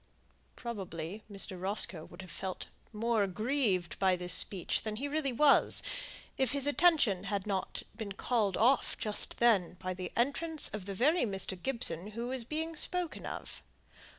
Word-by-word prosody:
Probably 195 Hz, -5 st, -6 dB
Mr. 195 Hz, -2 st, -3 dB
Roscoe 190 Hz, -4 st, -1 dB
would 175 Hz, +2 st, -11 dB
have 185 Hz, -, -11 dB
felt 190 Hz, +2 st, -5 dB, 0.3 s
more 225 Hz, 0 st, +1 dB
aggrieved 200 Hz, -, 0 dB
by 190 Hz, -2 st, +4 dB
this 180 Hz, 0 st, +2 dB
speech 180 Hz, 0 st, +2 dB
than 215 Hz, -1 st, -4 dB
he 270 Hz, +6 st, -3 dB
really 290 Hz, -2 st, -1 dB
was, 280 Hz, +4 st, +4 dB, 0.6 s
if 265 Hz, -2 st, +2 dB
his 280 Hz, -1 st, +4 dB
attention 290 Hz, -, +3 dB
had 200 Hz, -1 st, -2 dB
not 195 Hz, -3 st, -2 dB
been 210 Hz, -4 st, -5 dB
called 210 Hz, -2 st, 0 dB
off 255 Hz, +4 st, +3 dB
just 210 Hz, -1 st, +1 dB
then 205 Hz, -8 st, +3 dB
by 185 Hz, +1 st, -4 dB
the 180 Hz, 0 st, -6 dB
entrance 290 Hz, +5 st, 0 dB
of 205 Hz, -3 st, -6 dB
the 195 Hz, -, -4 dB
very 305 Hz, -, +3 dB
Mr. 195 Hz, -3 st, 0 dB
Gibson 230 Hz, -9 st, -1 dB
who 235 Hz, +1 st, -3 dB
was 260 Hz, -2 st, -2 dB
being 320 Hz, +6 st, -3 dB
spoken 355 Hz, +1 st, +1 dB
of. -, -, -7 dB
215 Hz, 160 wpm, -32 LUFS, 190-265 Hz, 0.6 s, by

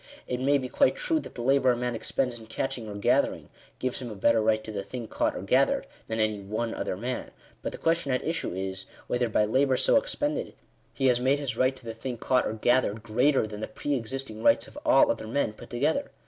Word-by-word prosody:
It 125 Hz, -, -3 dB
may 140 Hz, +2 st, +3 dB
be 130 Hz, -2 st, -3 dB
quite 275 Hz, -, +3 dB
true 370 Hz, -11 st, 0 dB
that -, -, -10 dB
the 120 Hz, -, -5 dB
labour 130 Hz, -1 st, +4 dB
a -, -, -3 dB
man 125 Hz, 0 st, -1 dB
expends 120 Hz, +1 st, -2 dB
in 110 Hz, -, -13 dB
catching 120 Hz, -1 st, -3 dB
or 100 Hz, -, -6 dB
gathering, 100 Hz, -, +1 dB, 0.3 s
gives 130 Hz, -1 st, -2 dB
him 125 Hz, -2 st, -6 dB
a 110 Hz, -, -7 dB
better 115 Hz, +3 st, +3 dB
right 110 Hz, 0 st, +2 dB
to 110 Hz, -, -7 dB
the 100 Hz, -2 st, -3 dB
thing 115 Hz, +3 st, -6 dB
caught -, -, 0 dB
or -, -, -5 dB
gathered, -, -, +2 dB, 0.2 s
than 110 Hz, 0 st, -2 dB
any 110 Hz, -1 st, +1 dB
one 110 Hz, +4 st, -3 dB
other 90 Hz, -, -3 dB
man; 125 Hz, +4 st, -4 dB, 0.3 s
but -, -, -3 dB
the -, -, -7 dB
question 165 Hz, -4 st, +1 dB
at 130 Hz, -, 0 dB
issue 165 Hz, -, -2 dB
is, 95 Hz, 0 st, -4 dB, 0.2 s
whether 120 Hz, -1 st, 0 dB
by 105 Hz, -1 st, +3 dB
labour 130 Hz, +4 st, +2 dB
so -, -, +4 dB
expended, -, -, -1 dB, 0.4 s
he 135 Hz, -, 0 dB
has 125 Hz, -2 st, +4 dB
made 130 Hz, +3 st, +3 dB
his 140 Hz, -4 st, -3 dB
right 130 Hz, +2 st, +2 dB
to 130 Hz, -2 st, -15 dB
the 115 Hz, -, -4 dB
thing 120 Hz, +2 st, -5 dB
caught 125 Hz, +2 st, +2 dB
or -, -, -2 dB
gathered, 110 Hz, -1 st, +1 dB
greater 125 Hz, +4 st, +3 dB
than 105 Hz, -1 st, -7 dB
the -, -, -3 dB
pre 145 Hz, +6 st, -3 dB
existing 125 Hz, -2 st, -4 dB
rights 190 Hz, -, +4 dB
of -, -, -16 dB
all 300 Hz, -1 st, +6 dB
other 200 Hz, -, -4 dB
men 115 Hz, -2 st, 0 dB
put -, -, -13 dB
together. 150 Hz, -, 0 dB
125 Hz, 240 wpm, -27 LUFS, 110-135 Hz, 0.4 s, all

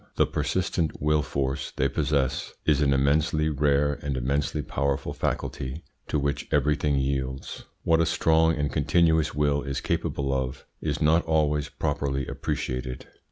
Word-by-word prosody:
The -, -, +4 dB
persistent 90 Hz, -3 st, -1 dB
will 75 Hz, +1 st, +2 dB
force 70 Hz, -2 st, -2 dB
they 65 Hz, -, +2 dB
possess 70 Hz, -3 st, -1 dB
is 75 Hz, -2 st, +3 dB
an 70 Hz, -1 st, +3 dB
immensely 75 Hz, +3 st, +2 dB
rare 70 Hz, 0 st, +1 dB
and 70 Hz, -2 st, -2 dB
immensely 70 Hz, +4 st, -1 dB
powerful 70 Hz, -1 st, -1 dB
faculty 65 Hz, +6 st, -3 dB, 0.2 s
to -, -, 0 dB
which 70 Hz, 0 st, -1 dB
everything 75 Hz, 0 st, +2 dB
yields. 65 Hz, -1 st, -2 dB, 0.2 s
What 80 Hz, 0 st, +3 dB
a 85 Hz, -, +2 dB
strong 80 Hz, -1 st, +3 dB
and 75 Hz, -1 st, -2 dB
continuous 80 Hz, 0 st, +2 dB
will 75 Hz, -1 st, +2 dB
is 70 Hz, -1 st, -3 dB
capable 70 Hz, -1 st, -1 dB
of 65 Hz, -1 st, -3 dB, 0.2 s
is 75 Hz, 0 st, -1 dB
not 80 Hz, +3 st, +4 dB
always 75 Hz, -2 st, +1 dB
properly 70 Hz, -1 st, -2 dB
appreciated. 65 Hz, 0 st, -4 dB
70 Hz, 145 wpm, -26 LUFS, 70-75 Hz, 0.2 s, The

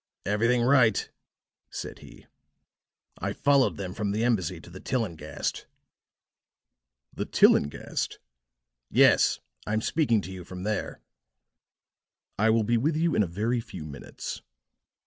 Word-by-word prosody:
"Everything 115 Hz, +5 st, +2 dB
right," 125 Hz, -3 st, +3 dB, 0.6 s
said -, -, -7 dB
he. -, -, -15 dB, 0.9 s
"I -, -, -2 dB
followed 140 Hz, -2 st, +3 dB
them 95 Hz, -2 st, -5 dB
from 105 Hz, +1 st, -2 dB
the 110 Hz, +3 st, 0 dB
embassy 95 Hz, -8 st, 0 dB
to 85 Hz, -, -14 dB
the 95 Hz, -, -9 dB
Tillinghast." 110 Hz, -, -3 dB, 1.5 s
"The -, -, -3 dB
Tillinghast!" 70 Hz, -, +2 dB, 0.7 s
"Yes, -, -, +4 dB, 0.3 s
I'm 110 Hz, +1 st, 0 dB
speaking 120 Hz, -3 st, +2 dB
to 95 Hz, -, -8 dB
you 95 Hz, -1 st, -7 dB
from 90 Hz, +1 st, -8 dB
there." 105 Hz, 0 st, -3 dB, 1.4 s
"I 110 Hz, +2 st, +4 dB
will 110 Hz, 0 st, +3 dB
be 115 Hz, +2 st, +2 dB
with 150 Hz, +7 st, +1 dB
you 165 Hz, 0 st, +1 dB
in -, -, +3 dB
a 100 Hz, -, +1 dB
very 110 Hz, +8 st, -1 dB
few 90 Hz, -7 st, -9 dB
minutes." 70 Hz, -2 st, -7 dB
110 Hz, 125 wpm, -27 LUFS, 95-120 Hz, 1.5 s, Yes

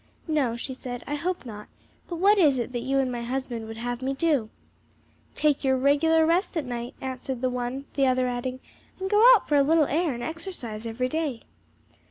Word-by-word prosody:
"No," 285 Hz, -7 st, +1 dB
she 260 Hz, +2 st, -5 dB
said, 245 Hz, -1 st, -7 dB
"I 290 Hz, -, -4 dB
hope 345 Hz, +2 st, -2 dB
not; 210 Hz, -3 st, -8 dB, 0.4 s
but 345 Hz, -, -3 dB
what 400 Hz, +4 st, +4 dB
is 295 Hz, -7 st, +5 dB
it 240 Hz, 0 st, -3 dB
that 245 Hz, -, -2 dB
you 265 Hz, +3 st, -1 dB
and 265 Hz, -2 st, +1 dB
my 240 Hz, -1 st, -4 dB
husband 240 Hz, -2 st, -4 dB
would 225 Hz, 0 st, -8 dB
have 245 Hz, +1 st, -4 dB
me 270 Hz, +1 st, -1 dB
do?" 275 Hz, -7 st, +1 dB, 0.9 s
"Take 300 Hz, -2 st, +1 dB
your 265 Hz, -1 st, +3 dB
regular 305 Hz, +4 st, +4 dB
rest 345 Hz, +3 st, +1 dB
at 305 Hz, -, -1 dB
night," 240 Hz, -1 st, -5 dB
answered 260 Hz, -1 st, -4 dB
the 255 Hz, -1 st, +1 dB
one, 250 Hz, +2 st, -3 dB
the 275 Hz, -1 st, +2 dB
other 255 Hz, 0 st, +2 dB
adding, 255 Hz, +1 st, -3 dB, 0.4 s
"And 380 Hz, +1 st, -3 dB
go 415 Hz, +1 st, +5 dB
out 435 Hz, -, -2 dB
for 295 Hz, -, +3 dB
a -, -, +6 dB
little 310 Hz, +2 st, +4 dB
air 320 Hz, +3 st, 0 dB
and 240 Hz, -, -6 dB
exercise 315 Hz, -, -6 dB
every 240 Hz, +3 st, -1 dB
day." 290 Hz, -4 st, -3 dB
265 Hz, 210 wpm, -26 LUFS, 245-315 Hz, 0.9 s, a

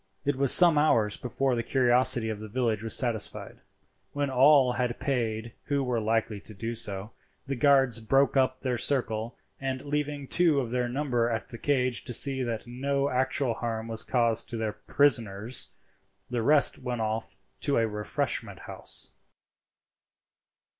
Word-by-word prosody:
It 145 Hz, 0 st, 0 dB
was 135 Hz, -1 st, +4 dB
some 170 Hz, -4 st, +9 dB
hours 110 Hz, -9 st, +2 dB
before 130 Hz, +2 st, -2 dB
the 120 Hz, -, -1 dB
curiosity 125 Hz, -1 st, +3 dB
of 110 Hz, -2 st, -5 dB
the 110 Hz, -, -8 dB
village 115 Hz, -2 st, -1 dB
was 110 Hz, -1 st, -1 dB
satisfied. 120 Hz, -5 st, -3 dB, 0.5 s
When 145 Hz, -1 st, -2 dB
all 135 Hz, 0 st, +5 dB
had 125 Hz, -1 st, -3 dB
paid 115 Hz, -4 st, -3 dB
who 140 Hz, -1 st, -1 dB
were 125 Hz, -2 st, -1 dB
likely 110 Hz, -1 st, -1 dB
to 105 Hz, +1 st, -11 dB
do 115 Hz, +4 st, -4 dB
so, 105 Hz, -2 st, -3 dB, 0.3 s
the 135 Hz, 0 st, -3 dB
guards 135 Hz, -2 st, +3 dB
broke 135 Hz, +5 st, +1 dB
up 130 Hz, -1 st, +1 dB
their 125 Hz, -3 st, -2 dB
circle, 115 Hz, -4 st, -2 dB, 0.2 s
and 135 Hz, -1 st, -4 dB
leaving 145 Hz, -1 st, -3 dB
two 165 Hz, -3 st, +3 dB
of 120 Hz, -4 st, -4 dB
their 125 Hz, -1 st, -1 dB
number 125 Hz, -3 st, -1 dB
at 110 Hz, -2 st, -4 dB
the 115 Hz, -, -9 dB
cage 130 Hz, -4 st, -1 dB
to 125 Hz, -, -3 dB
see 135 Hz, +2 st, +2 dB
that 115 Hz, -3 st, -4 dB
no 140 Hz, +3 st, -2 dB
actual 130 Hz, 0 st, 0 dB
harm 115 Hz, -1 st, -4 dB
was 115 Hz, -1 st, -1 dB
caused 115 Hz, -3 st, 0 dB
to 115 Hz, -, -4 dB
their 110 Hz, -2 st, -3 dB
prisoners, 115 Hz, -4 st, -1 dB, 0.6 s
the 120 Hz, -1 st, -1 dB
rest 145 Hz, +5 st, +4 dB
went 125 Hz, -2 st, -4 dB
off 110 Hz, +1 st, -4 dB, 0.2 s
to 140 Hz, -1 st, 0 dB
a 115 Hz, -1 st, +2 dB
refreshment 105 Hz, -1 st, -3 dB
house. -, -, -5 dB
125 Hz, 160 wpm, -27 LUFS, 115-135 Hz, 0.6 s, some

